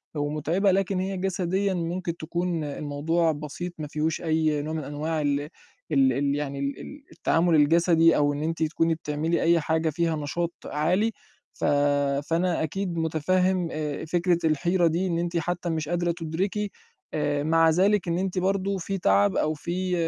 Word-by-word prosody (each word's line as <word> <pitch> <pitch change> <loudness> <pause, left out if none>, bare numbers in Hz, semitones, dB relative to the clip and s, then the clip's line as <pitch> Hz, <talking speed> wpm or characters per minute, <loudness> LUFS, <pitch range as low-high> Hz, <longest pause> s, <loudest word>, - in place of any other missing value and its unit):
ومُتعبة، 155 +7 +1
لكن 190 0 +1
هي 190 0 -2
جسديًا 190 +1 0
ممكن 170 0 -3
تكون 170 0 -2
الموضوع 150 +3 0
بسيط 155 +4 -6
ما 150 - -5
فيهوش 155 +2 -2
أي 155 -2 +1
نوع 155 +2 -4
من 160 -1 -3
أنواع 150 +3 -2
ال 145 -1 +1 0.5
ال 135 -3 +4
ال 140 +2 0
يعني 140 -1 -3
ال 140 0 -3
ال 285 -1 -10
التعامل 165 0 +2
الجسدي 165 +2 +4
أو 145 0 +2
إن 145 +1 -3
أنتِ 165 0 -1
تكوني 165 +1 +1
بتعملي 155 +2 -1
أي 170 0 +4
حاجة 160 +1 0
فيها 165 +1 0
نشاط 165 +3 -2
عالي، 180 +9 +1 0.4
ف - - -9 0.7
فأنا 170 0 +1
أكيد 175 +2 -3
مُتفهِّم 180 +3 +1
آآ 150 -1 -3
فكرة 175 +1 +1
الحيرة 170 +3 +2
دي 170 +4 0
إن 170 -2 -1
أنتِ 170 0 -1
حتّى 175 +1 -2
مش 160 -2 -2
قادرة 175 0 0
تُدركي، 185 +5 -2 0.4
آآ 145 -1 0
مع 165 +1 +4
ذلك 190 +4 +2
إن 170 0 0
أنتِ 190 0 -2
برضه 195 +1 0
في 195 +2 -3
تَعَب 100 - +3
أو 155 - +1
في 180 +4 -3
165 Hz, 165 wpm, -26 LUFS, 150-180 Hz, 0.7 s, ال